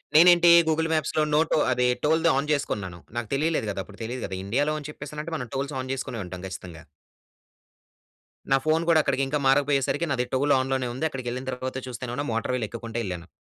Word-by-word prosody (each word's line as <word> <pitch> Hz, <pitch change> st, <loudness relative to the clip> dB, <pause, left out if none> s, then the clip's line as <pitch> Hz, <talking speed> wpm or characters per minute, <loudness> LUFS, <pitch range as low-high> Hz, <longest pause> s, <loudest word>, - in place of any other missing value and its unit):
నేనేంటి 175 Hz, +1 st, +8 dB, 0.2 s
Google 160 Hz, +1 st, +1 dB
మ్యాప్స్‌లో 155 Hz, 0 st, +1 dB
no 150 Hz, -, +5 dB
to -, -, +4 dB
అది 125 Hz, 0 st, +2 dB, 0.2 s
టోల్‌ది 160 Hz, +2 st, +3 dB
on 140 Hz, +2 st, 0 dB
చేసుకున్నాను. 100 Hz, -11 st, -2 dB, 0.2 s
నాకు 120 Hz, -3 st, -3 dB
తెలియలేదు 150 Hz, -4 st, 0 dB
కదా! 100 Hz, -, -5 dB
అప్పుడు 100 Hz, +3 st, -15 dB
తెలీదు 120 Hz, +3 st, -4 dB
కదా 95 Hz, -, -5 dB
ఇండియాలో 140 Hz, +9 st, +1 dB
అని 145 Hz, -, -8 dB
చెప్పేసానంటే, 150 Hz, +2 st, -7 dB
మనం 125 Hz, -4 st, -6 dB
టోల్స్ 140 Hz, +1 st, -3 dB
ఆన్ 130 Hz, -, -5 dB
చేసుకొనే 125 Hz, -3 st, -4 dB
ఉంటాం 90 Hz, +1 st, -8 dB
ఖచ్చితంగా. 90 Hz, -3 st, -9 dB, 1.7 s
నా 135 Hz, -, +6 dB
ఫోన్ 160 Hz, +1 st, +2 dB
కూడా 160 Hz, -2 st, +6 dB
అక్కడికి 135 Hz, -1 st, 0 dB
ఇంకా 145 Hz, +2 st, -1 dB
మారకపోయేసరికి 140 Hz, +3 st, +2 dB
నాది 125 Hz, -2 st, 0 dB
టోల్ 140 Hz, +2 st, +3 dB
ఆన్ 130 Hz, 0 st, -2 dB
లోనే 130 Hz, -2 st, 0 dB
ఉంది 155 Hz, +6 st, -1 dB
అక్కడికి 130 Hz, -4 st, -6 dB
వెళ్ళిన 130 Hz, +2 st, -5 dB
తర్వాత 130 Hz, +1 st, -4 dB
చూస్తేనే‌మో 125 Hz, 0 st, -5 dB
నా -, -, -3 dB
మోటర్ 115 Hz, +2 st, -1 dB
వీల్ 115 Hz, -4 st, -2 dB
ఎక్కుకుంటూ 115 Hz, 0 st, -6 dB
వెళ్ళాను. 90 Hz, -3 st, -5 dB
135 Hz, 195 wpm, -26 LUFS, 115-150 Hz, 1.7 s, నేనేంటి